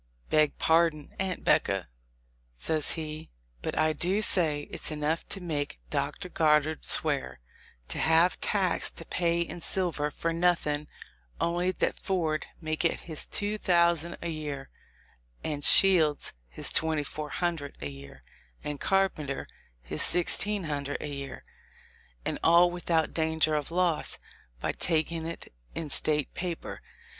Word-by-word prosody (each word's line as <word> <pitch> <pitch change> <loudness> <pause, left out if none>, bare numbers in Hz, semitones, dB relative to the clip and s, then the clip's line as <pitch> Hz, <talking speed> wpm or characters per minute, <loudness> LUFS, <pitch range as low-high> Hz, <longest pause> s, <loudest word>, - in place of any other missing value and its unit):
"Beg 155 -1 +3
pardon, 160 -2 +2
Aunt 190 -2 -2
'Becca," 95 -4 +2 0.7
says 155 - 0
he; 155 -1 -6 0.3
"but - - -4
I 155 0 +3
do 185 +7 0
say 155 -8 +4
it's - - -3
enough 155 +1 -2
to - - -4
make 150 -5 -3
Dr. 145 +6 -2
Goddard 155 -2 +2
swear, 65 0 +3 0.5
to - - -3
have 165 +3 +3
tax 195 -4 +1
to 165 - -10
pay 170 0 0
in 170 0 -4
silver, 165 -5 -1
for 165 +3 -2
nothing 165 -4 +1 0.5
only 175 +2 +1
that - - -1
Ford 165 -5 -1
may 155 -1 -2
get 165 +1 0
his 160 -3 -3
two 210 +1 -1
thousand 170 -2 +2
a 170 - -2
year, 145 -4 -5 0.7
and 145 -2 -3
Shields 165 -6 +5 0.2
his - - -2
twenty 160 -2 +2
four 150 +1 -6
hundred 165 -4 -3
a 70 - -4
year, 70 0 -12 0.4
and 150 -1 -4
Carpenter 190 -8 0 0.4
his 75 +5 0
sixteen 195 +3 +4
hun 145 -3 -2
dred 145 - -3
a - - -5
year, 140 -2 -7 0.8
and - - -2
all 170 +2 +6
without 170 -2 0
'danger 160 -1 +1
of 150 -2 -1
loss' 175 -2 +1 0.4
by - - -1
tak 160 -1 0
ing 165 -1 -4
it 165 - -8 0.2
in 155 -3 -4
State 150 -1 0
paper. 175 -2 -5
160 Hz, 145 wpm, -28 LUFS, 150-175 Hz, 0.8 s, all